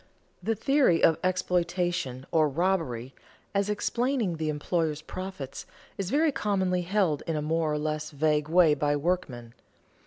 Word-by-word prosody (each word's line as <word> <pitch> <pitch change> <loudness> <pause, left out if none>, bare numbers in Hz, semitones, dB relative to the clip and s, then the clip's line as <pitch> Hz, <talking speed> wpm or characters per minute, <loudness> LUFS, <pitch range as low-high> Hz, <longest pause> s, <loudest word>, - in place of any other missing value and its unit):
The 225 - 0
theory 270 - +3
of 160 - +5
exploitation, 175 -7 -1
or 155 -2 +3
robbery, 140 -7 -1 0.4
as 200 0 +1
explaining 235 -2 0
the 155 -1 -2
employer's 155 0 -1
profits, 185 -9 -7 0.3
is 195 -2 -3
very 305 +4 +3
commonly 190 -6 0
held 180 -5 +1
in 165 - -1
a - - 0
more 160 0 0
or 150 - 0
less 150 0 -2
vague 150 0 0
way 170 -2 +5
by 145 0 +1
workmen. 140 -8 -2
165 Hz, 145 wpm, -28 LUFS, 150-190 Hz, 0.4 s, of